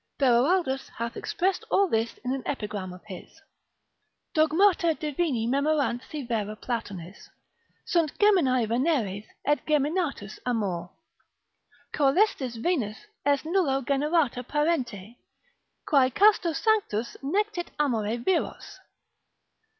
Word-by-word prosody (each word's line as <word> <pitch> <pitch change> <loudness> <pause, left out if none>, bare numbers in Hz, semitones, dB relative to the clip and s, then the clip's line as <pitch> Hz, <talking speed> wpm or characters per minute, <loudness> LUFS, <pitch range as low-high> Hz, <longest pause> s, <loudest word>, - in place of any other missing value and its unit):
Beroaldus 270 +3 +2
hath 235 0 -3
expressed 375 +2 -1
all 395 - +3
this 225 -6 -1
in 255 - 0
an 270 - -3
epigram 210 -8 -4
of 180 0 -12
his: 195 - -11 0.9
Dogmata 335 +2 +3
divini 295 -6 -1
memorant 280 -1 +1
si 300 -2 -5
vera 215 -3 -2
Platonis, 200 -6 -6 0.6
Sunt 330 -4 0
geminae 275 - +3
Veneres, 230 - 0 0.2
et 295 +1 +1
geminatus 300 - -1
amor. 195 -8 -2 1.0
Coelestis 280 - +2
Venus 235 - -1 0.3
est 285 +1 +2
nullo 310 -7 +1
generata 280 -2 +1
parente, 250 - -1 0.7
Quae 270 -4 +4
casto 405 - +4
sanctos 325 - 0
nectit 365 +5 -1
amore 230 -6 0
viros. 335 +9 -2
275 Hz, 105 wpm, -27 LUFS, 230-330 Hz, 1.0 s, Quae